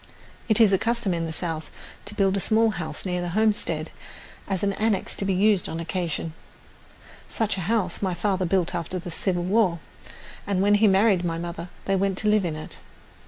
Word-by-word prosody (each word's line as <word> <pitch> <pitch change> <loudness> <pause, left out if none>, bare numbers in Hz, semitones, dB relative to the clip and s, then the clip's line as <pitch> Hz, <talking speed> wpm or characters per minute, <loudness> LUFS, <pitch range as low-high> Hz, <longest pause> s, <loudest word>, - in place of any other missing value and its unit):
It 220 - +3
is 215 -4 +6
a 190 - +4
custom 235 -4 0
in 165 -1 -1
the 165 - -4
South 160 -2 -3 0.4
to 210 - -7
build 195 -1 +2
a - - +1
small 220 +3 +3
house 160 -5 -4
near 180 -1 -1
the 175 - -3
homestead 215 -1 +1 0.6
as 195 -1 -2
an 200 0 +1
annex 215 -1 0
to 195 - -3
be 195 - +1
used 200 0 +3
on 165 - -4
occasion. 165 -1 -3 1.0
Such 220 -2 0
a 190 - -4
house 205 -6 0
my 185 -3 0
father 185 +1 0
built 180 -1 +1
after 175 +1 -2
the 175 0 -6
Civil 175 +1 -1
War, 190 -2 +2 0.7
and 200 -2 0
when 205 +2 +4
he 220 - +7
married 195 -1 +4
my 165 -1 -1
mother 170 0 -5 0.2
they 195 - +1
went 195 0 0
to 215 - -2
live 210 -2 +3
in 160 -3 -2
it. 155 - -8
190 Hz, 205 wpm, -25 LUFS, 175-205 Hz, 1.0 s, he